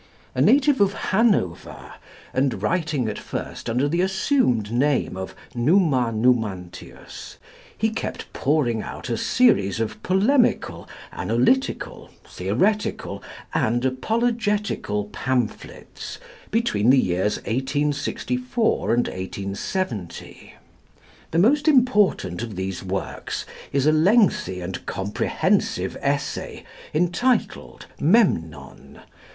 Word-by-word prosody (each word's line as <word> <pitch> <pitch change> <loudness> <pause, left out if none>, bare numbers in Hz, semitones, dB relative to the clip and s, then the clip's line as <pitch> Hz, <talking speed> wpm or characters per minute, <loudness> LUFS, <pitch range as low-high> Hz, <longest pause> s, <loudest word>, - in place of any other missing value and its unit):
A - - 0
native 280 -2 +4
of 200 0 +3 0.2
Hanover, 195 - 0 0.4
and 130 0 0
writing 155 -8 0
at 105 - -4
first - - -6
under 125 +5 +1
the 170 +4 +1
assumed 190 - +1
name 135 -2 +1
of 95 0 -6 0.2
Numa 130 -2 +2
Numantius, 110 -6 -2 0.4
he 220 0 +1
kept 220 - -5
pouring 135 -6 +1
out 125 - -7
a - - +1
series 110 - +3
of 115 -1 -3
polemical, 225 +8 +1 0.2
analytical, 125 - 0 0.2
theoretical, 210 -1 -1 0.3
and 120 +3 +1
apologetical 210 - 0
pamphlets 125 -1 -4 0.3
between 205 - +1
the 135 - +6
years 95 -2 +1
1864 145 - -1
and 120 - +2
1870. 100 - -5 0.7
The 160 - -2
most 280 - +3
important 210 - +3
of 115 -4 -5
these 95 0 -4
works 95 0 -4 0.3
is 140 0 +1
a 155 - +5
lengthy 160 - +3
and 90 +1 -5
comprehensive 95 +2 0
Essay - - -2 0.3
entitled 180 +10 0
"Memnon. 80 - 0
135 Hz, 100 wpm, -23 LUFS, -, 0.7 s, the